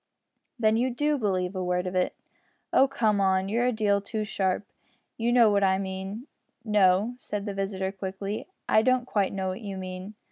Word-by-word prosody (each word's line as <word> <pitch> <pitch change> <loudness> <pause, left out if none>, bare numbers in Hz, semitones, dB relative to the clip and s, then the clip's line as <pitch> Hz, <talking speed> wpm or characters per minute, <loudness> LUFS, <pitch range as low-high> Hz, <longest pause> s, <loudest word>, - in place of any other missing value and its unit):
"Then 220 -2 +3
you 250 +3 +2
do 295 +4 0
believe 190 -4 -1
a 185 - -2
word 180 0 0
of 180 - -3
it?" 185 -1 0 0.6
"Oh! 270 - +6
come, 225 -7 +1 0.3
you're 235 +4 +1
a - - +3
deal 205 -3 +1
too 215 +2 -3
sharp. 195 -1 -1 0.5
You 235 +1 0
know 235 -3 +6
what 200 -1 +2
I 190 -1 +3
mean." 190 +4 -5 0.4
"No," 205 +1 +3
said 205 -4 -4
his 200 - -3
visitor, 195 -1 -2
quickly, 195 +1 -5 0.2
"I 215 - +5
don't 255 +1 +2
quite 205 -6 0
know 190 -1 -2
what 185 +5 -5
you 200 -3 -5
mean. 185 +2 -7
200 Hz, 185 wpm, -27 LUFS, 190-225 Hz, 0.6 s, Oh